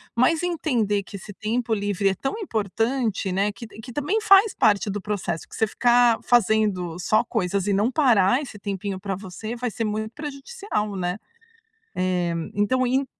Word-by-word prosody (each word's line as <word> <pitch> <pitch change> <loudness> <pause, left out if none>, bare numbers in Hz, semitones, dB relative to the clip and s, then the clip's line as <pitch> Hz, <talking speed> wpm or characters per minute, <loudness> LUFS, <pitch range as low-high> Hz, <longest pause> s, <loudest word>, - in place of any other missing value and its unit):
Mas 255 +7 +3
entender 245 - 0
que 200 - -11
esse 200 +1 -9
tempo 225 +3 -2
livre 200 -1 0
é 190 - -1
tão 270 - -3
importante, 225 - -1
né, 200 +3 +1
que 230 +3 -10
t 215 - -14
que 245 +2 -10
também 295 - 0
faz 410 -1 +5
parte 205 -1 +3
do 205 +1 -2
processo, 195 -5 -3
que - - -12
você 220 - +1
ficar 240 +1 +4
fazendo 210 -7 +2
só 215 +5 +2
coisas 200 -4 -1
e 205 - +2
não 210 +5 +2
parar 245 -5 +4
esse 255 -7 -8
tempinho 200 -1 -4
pra 195 0 -3
você, 195 +4 -7
vai 245 +1 -2
ser 230 +1 -4
muito 215 +1 -3
prejudicial, 290 - -4
né. 180 0 -2 0.8
Eh, 180 -2 0 0.2
então 250 +5 +2
en 265 +3 +1
215 Hz, 175 wpm, -24 LUFS, 195-250 Hz, 0.8 s, faz